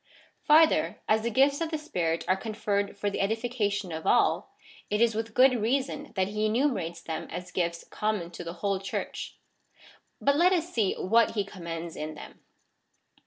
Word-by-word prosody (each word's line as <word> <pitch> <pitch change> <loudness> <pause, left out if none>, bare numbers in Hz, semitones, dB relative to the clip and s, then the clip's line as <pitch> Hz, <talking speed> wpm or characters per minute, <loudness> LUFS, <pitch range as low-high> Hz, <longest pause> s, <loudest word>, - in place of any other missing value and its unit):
Farther, 315 +1 +4
as 220 0 +3
the 235 - -1
gifts 275 +6 +3
of 330 - 0
the 315 - -2
Spirit 170 - -2
are 185 - +4
conferred 205 -1 -2
for 205 0 -1
the - - -2
edification 205 -3 -1
of 160 0 -5
all, - - +3 0.4
it 210 - 0
is 230 0 +4
with 225 0 -4
good 255 +1 +6
reason 275 +5 -1
that 190 -1 +1
he 210 +1 -2
enumerates 215 - 0
them 160 - -4
as 180 0 -6
gifts 170 -1 -2
common 210 -5 -2
to 175 - -7
the 170 0 -6
whole 195 -1 +1
Church.^ 195 0 -5 0.8
But 280 +1 +2
let 360 +3 +5
us 350 0 -1
see 215 -5 +1
what 225 +4 +2
he 205 -2 0
commends 170 -3 -6
in 155 0 -5
them. - - -11
210 Hz, 175 wpm, -28 LUFS, 180-250 Hz, 0.8 s, good